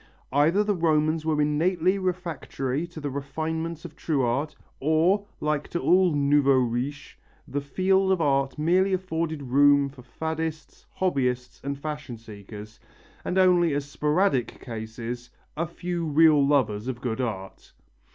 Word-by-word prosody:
Either 160 +9 +4
the 210 0 +1
Romans 155 -2 +1
were 155 -1 +1
innately 170 +6 +2
refractory 170 -5 -3
to 170 -2 -10
the 145 -2 -4
refinements 160 +4 -4
of 165 - -9
true 145 -5 0
art, 140 +6 -1 0.2
or, 165 +8 +2
like 150 -1 -1
to 170 - -3
all 185 0 +4
nouveaux 140 -1 +4
riches, 125 +3 -2 0.3
the 145 - -2
field 190 +6 +2
of 190 - +2
art 140 -3 +1
merely 185 +5 +2
afforded 165 -5 -2
room 140 +2 +4
for 135 -2 -14
faddists, 160 +3 -5
hobbyists 125 -8 -1
and 140 0 -3
fashion 150 -4 -6
seekers, 105 -1 -11 0.4
and, 185 - -2
only 175 -4 +4
as 145 -1 -2
sporadic 150 - 0
cases, 115 +1 -6 0.3
a 165 +2 -1
few 175 0 -4
real 155 -1 +5
lovers 120 -6 +1
of 130 -2 -3
good 125 0 -2
art. 95 -6 -5
150 Hz, 140 wpm, -26 LUFS, 135-170 Hz, 0.4 s, real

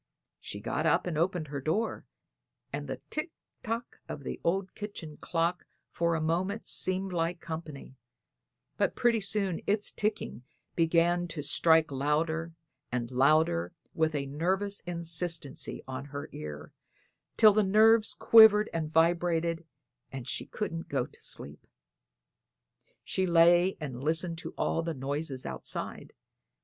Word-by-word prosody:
She - - -7
got - - -1
up - - +3
and 175 -3 -2
opened 170 -1 0
her 140 -1 -4
door, 185 +11 -1 0.7
and - - -4
the - - -5
"tick 305 +3 -2 0.3
tock" 230 0 -4
of 140 - -6
the - - -5
old 190 +2 0
kitchen 175 -8 -7
clock 170 +1 -1 0.2
for 170 0 +1
a - - 0
moment 180 +7 -1
seemed 185 0 -1
like 170 +1 -1
company; 160 -5 -7 0.8
but - - +1
pretty 235 -2 +2
soon 195 -3 -1
its 205 +1 +1
ticking 210 - -2 0.3
began 170 +1 +2
to 160 -3 -5
strike 160 +1 +3
louder 160 +4 0 0.4
and 120 -1 -2
louder 130 - +3 0.2
with 160 -1 +1
a 140 -1 -1
nervous 190 +8 -1
insistency 170 -3 -3
on 130 +1 -5
her 145 0 -7
ear, 75 -1 -8 0.6
till 215 -2 +8
the 215 - +4
nerves 215 +2 +4
quivered 220 -2 +7
and 155 -2 -2
vibrated, 165 0 +1 0.4
and 135 -2 -7
she - - -3
couldn't 165 -6 -4
go 135 -4 0
to - - -17
sleep. 75 +1 -6 1.4
She 190 0 -1
lay 175 +2 +5
and 135 -5 -6
listened 165 +2 0
to - - -7
all 165 - 0
the 165 -1 -3
noises 140 0 -3
outside. - - -5
165 Hz, 135 wpm, -30 LUFS, 150-190 Hz, 1.4 s, till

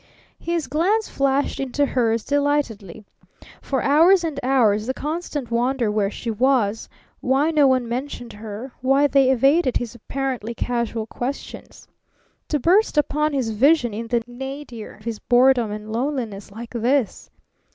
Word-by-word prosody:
His 335 -3 -2
glance 355 +11 +1
flashed 275 +1 0
into 275 +2 0
hers 230 -4 0
delightedly. 280 -10 -1 0.6
For 270 -2 -2
hours 335 +6 +5
and 310 -4 -3
hours 230 -5 +2
the 260 - -2
constant 300 -5 -4
wonder 240 -1 +1
where 210 -2 +1
she 230 +2 -5
was, 225 -2 +1 0.3
why 275 +5 +1
no 300 -3 +4
one 255 -2 +2
mentioned 245 0 -5
her, 215 +4 -8
why 270 +3 +3
they 275 -2 +4
evaded 270 +2 +3
his 240 -3 -4
apparently 240 -1 -4
casual 235 -2 -2
questions. 250 +5 -7 0.6
To 300 - 0
burst 360 - +3
upon 300 +1 +1
his 255 -5 -1
vision 245 +1 +3
in 230 +2 -5
the 235 0 0
nadir 255 -2 -8
of 210 - -20
his 230 -2 -4
boredom 245 -2 +3
and 210 +1 -7
loneliness 230 -5 -3
like 230 +3 -9
this! 245 0 0
255 Hz, 145 wpm, -22 LUFS, 230-285 Hz, 0.6 s, hours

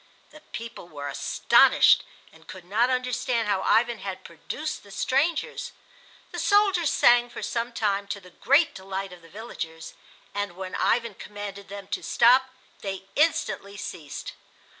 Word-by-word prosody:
The 305 - -14
people 230 -5 -7
were 145 -2 -6
astonished 140 - +5 0.3
and - - -19
could 185 -2 -10
not 220 +7 +2
understand 250 -2 0
how 200 -2 +1
Ivan 235 +3 +2
had 190 -2 -6
produced 300 - -6
the 200 - -17
strangers. 280 - -1 0.6
The - - -5
soldiers 395 -7 +3
sang 240 0 +5
for - - -8
some 235 +1 -2
time, 200 -3 -1
to 200 0 -4
the 180 -2 -16
great 285 - +3
delight 190 0 -5
of 180 - -13
the 165 - -17
villagers; 165 -6 -7 0.4
and 205 -3 -3
when 185 0 -7
Ivan 235 -2 +1
commanded 200 0 -8
them 200 -1 -8
to - - -2
stop 255 +2 +4 0.3
they 195 -1 -5
instantly 285 -10 +1
ceased. 160 -8 -7
205 Hz, 150 wpm, -26 LUFS, 190-245 Hz, 0.6 s, astonished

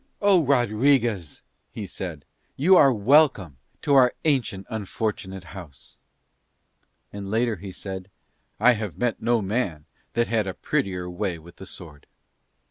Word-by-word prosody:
"Oh, 195 -4 +4
Rodriguez," 120 - +1 0.3
he 105 - -7
said, 85 -6 -6 0.3
"you 180 +8 +5
are 140 -6 +7
welcome 110 - +3 0.3
to 145 - +2
our 130 -2 +5
ancient, 125 -10 0
unfortunate 105 -3 -4
house": 85 -8 -12 1.2
and 100 -1 -6
later 115 0 0
he 95 +2 -8
said, 95 0 -7 0.5
"I 125 - +6
have 105 -8 -3
met 120 -2 -1
no 120 -2 +1
man 95 -7 -2 0.3
that 120 0 +2
had 110 -4 0
a 95 - -4
prettier 90 -2 -2
way 90 0 -3
with 85 +2 -15
the 95 - -10
sword." 75 -5 -10
105 Hz, 135 wpm, -24 LUFS, 90-125 Hz, 1.2 s, are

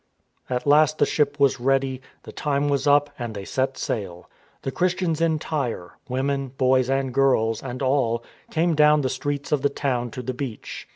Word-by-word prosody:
At 125 -1 -2
last 150 +1 +4
the - - +4
ship 145 -1 0
was 140 -2 +3
ready, 135 0 +1 0.2
the - - -10
time 145 0 -1
was 140 0 0
up 145 0 +4
and 120 -3 -5
they 100 -1 -6
set 135 +4 -1
sail. 90 -6 -4 0.4
The 135 - -2
Christians 175 -1 0
in 165 -1 +2
Tyre 135 - -3
— - - -37
women, 135 +2 -1
boys, 130 0 +2
and 135 -1 0
girls, 120 -5 +2
and 130 0 -5
all 125 -4 +1
— - - -31
came 165 +1 +1
down 150 0 +5
the 130 - 0
streets 140 +2 -3
of 150 -3 +2
the 140 - +2
town 125 -4 -2
to 125 +3 -7
the 130 - -3
beach. 125 -3 -6
135 Hz, 195 wpm, -24 LUFS, 125-145 Hz, 0.4 s, down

